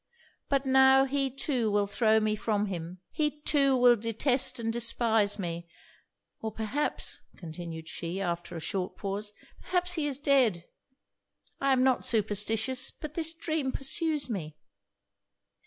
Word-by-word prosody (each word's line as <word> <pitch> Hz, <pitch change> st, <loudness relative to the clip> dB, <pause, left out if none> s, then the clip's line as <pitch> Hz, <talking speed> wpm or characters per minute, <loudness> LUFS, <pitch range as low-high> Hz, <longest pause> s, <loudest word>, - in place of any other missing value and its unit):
But 275 Hz, -1 st, +1 dB
now 265 Hz, 0 st, +5 dB
he 275 Hz, 0 st, -1 dB
too 255 Hz, -3 st, -1 dB
will 205 Hz, 0 st, +2 dB
throw 220 Hz, +2 st, +2 dB
me 215 Hz, 0 st, 0 dB
from 210 Hz, -1 st, -1 dB
him 180 Hz, -2 st, -6 dB
he 300 Hz, -1 st, -1 dB
too 275 Hz, -4 st, +3 dB
will 245 Hz, -1 st, +6 dB
detest 250 Hz, +4 st, +1 dB
and 225 Hz, -1 st, -2 dB
despise 225 Hz, -3 st, +2 dB
me 170 Hz, -3 st, -5 dB, 0.7 s
Or 220 Hz, -, -4 dB
perhaps,' 225 Hz, +8 st, -2 dB, 0.2 s
continued 165 Hz, -1 st, -8 dB
she, 170 Hz, +3 st, -5 dB
after 175 Hz, -2 st, -3 dB
a -, -, -4 dB
short 180 Hz, +3 st, -4 dB
pause 205 Hz, +1 st, -4 dB, 0.3 s
'perhaps 360 Hz, -1 st, 0 dB
he 315 Hz, -4 st, -1 dB
is 275 Hz, -3 st, -2 dB
dead. 260 Hz, -, +2 dB, 0.9 s
I 275 Hz, 0 st, +1 dB
am 255 Hz, -1 st, +3 dB
not 260 Hz, -1 st, +2 dB
superstitious 220 Hz, +4 st, +2 dB
but 305 Hz, -1 st, -9 dB
this 325 Hz, 0 st, 0 dB
dream 320 Hz, -4 st, -2 dB
pursues 300 Hz, +2 st, 0 dB
me.' 160 Hz, -10 st, -5 dB
230 Hz, 140 wpm, -29 LUFS, 200-275 Hz, 0.9 s, will